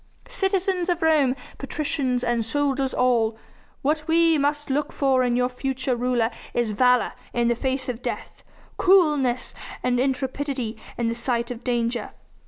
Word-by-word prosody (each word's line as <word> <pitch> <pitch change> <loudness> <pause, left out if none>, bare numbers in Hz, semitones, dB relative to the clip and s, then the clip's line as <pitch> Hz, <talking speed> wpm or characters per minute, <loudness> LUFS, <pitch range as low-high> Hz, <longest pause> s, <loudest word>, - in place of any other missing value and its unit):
Citizens 380 -2 0
of 345 -2 0
Rome, 295 -5 +4 0.2
patricians, 275 -3 -1
and 240 -2 +1
soldiers 275 +2 0
all! 230 -3 +2 0.5
What 305 +2 0
we 330 0 +4
must 290 0 0
look 290 +2 0
for 270 -2 +2
in 245 -1 +1
your 250 0 +2
future 260 0 -2
ruler 240 -1 +1 0.2
is 240 -3 +1
valour 250 +3 +3 0.2
in 240 0 +2
the 235 - +2
face 265 +2 -2
of 250 -1 -4
death, - - -5 0.3
coolness 300 -10 +3 0.3
and 245 -1 +1
intrepidity 265 -2 -1 0.2
in 235 - 0
the 230 - 0
sight 235 0 -1
of 240 -1 -7
danger. 240 -1 -1
260 Hz, 150 wpm, -24 LUFS, 240-290 Hz, 0.5 s, Rome